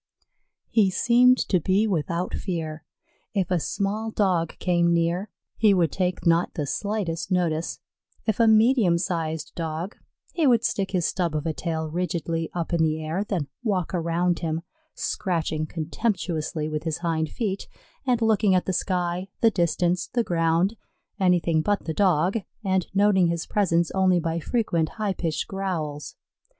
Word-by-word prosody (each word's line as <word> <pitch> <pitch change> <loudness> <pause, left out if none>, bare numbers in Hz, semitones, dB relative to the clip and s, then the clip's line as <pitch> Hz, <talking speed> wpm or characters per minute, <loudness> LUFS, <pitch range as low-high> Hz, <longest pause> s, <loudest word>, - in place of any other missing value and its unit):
He 210 -4 +4
seemed 245 +6 +5
to 185 - +3
be 190 +6 +2
without 175 -2 -1
fear. 160 -4 -4 0.5
If 190 -2 0
a 180 - +3
small 205 +6 -2
Dog 185 -6 0
came 170 -1 +2
near, 170 +4 0 0.3
he 210 -3 +5
would 170 -3 +2
take 180 -1 -1
not 170 0 +2
the 150 - -1
slightest 185 +3 -2
notice; 170 -3 0 0.5
if 220 -2 0
a 230 - +5
medium 220 -4 +5
sized 160 -3 -3
Dog, 165 +4 -4 0.4
he 320 -4 +2
would 235 -3 +4
stick 195 -4 0
his 180 -3 0
stub 170 -3 -1
of 150 +1 -2
a 160 - 0
tail 160 -1 -3
rigidly 165 -1 -2
up 170 -1 -3
in 170 - +2
the 155 -1 +1
air, 160 +5 -2
then 180 -9 -2
walk 195 -8 -1
around 170 0 0
him, 165 -1 -2 0.3
scratching 160 -4 -1
contemptuously 160 -2 -2
with 155 -1 -3
his 160 -2 -2
hind 160 -2 -1
feet, 200 -1 -3 0.4
and 245 -4 +1
looking 210 -3 +3
at 180 - +1
the 190 - -1
sky, 180 0 -1
the 225 - +5
distance, 175 -1 +1
the 240 -1 0
ground, 170 +3 +1 0.4
anything 175 -4 +3
but 205 +5 0
the 160 - -2
Dog, 185 +2 +2 0.3
and 190 -2 +1
noting 195 -3 +4
his 170 -1 -2
presence 170 -5 +1
only 185 -2 +3
by 165 0 -1
frequent 170 -4 0
high 210 -3 0
pitched 165 -4 -2
growls. 160 -8 -4
175 Hz, 160 wpm, -25 LUFS, 165-195 Hz, 0.5 s, seemed